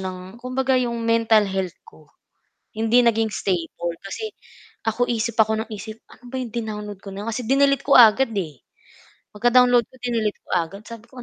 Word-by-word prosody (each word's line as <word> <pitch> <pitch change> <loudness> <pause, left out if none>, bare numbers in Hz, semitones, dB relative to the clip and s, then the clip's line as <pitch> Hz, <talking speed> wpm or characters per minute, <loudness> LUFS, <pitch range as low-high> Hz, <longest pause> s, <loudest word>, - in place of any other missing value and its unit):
ng 185 -1 -5 0.2
kumbaga 255 +1 0
'yong 235 -1 -2
mental 230 -2 +3
health 190 -2 -3
ko, 155 -2 -19 0.7
hindi 225 +3 +3
naging 225 -2 +2
stable, 170 -3 -3
kasi 430 - -6 0.5
ako 225 +2 0
isip 230 -1 -2
ako 220 0 +3
ng 225 - -21
isip 215 +1 -8
ano 235 - -19
ba 260 - -8
'yong 250 -3 -4
din-download 210 -3 -5
ko 195 -1 -10
na 200 - -6
'yon, 230 - -7
kasi 230 0 -4
dinilete 275 +1 +3
ko 280 - +5
agad, 235 +1 +7
eh, 155 -8 -4 0.7
pagka 240 +4 +4
download 245 -2 +3
ko, - - -28
dinilete 225 -4 -1
ko - - -22
agad, 180 +3 -2
sabi 230 0 -10
ko 255 -2 -10
225 Hz, 185 wpm, -22 LUFS, 205-245 Hz, 0.7 s, agad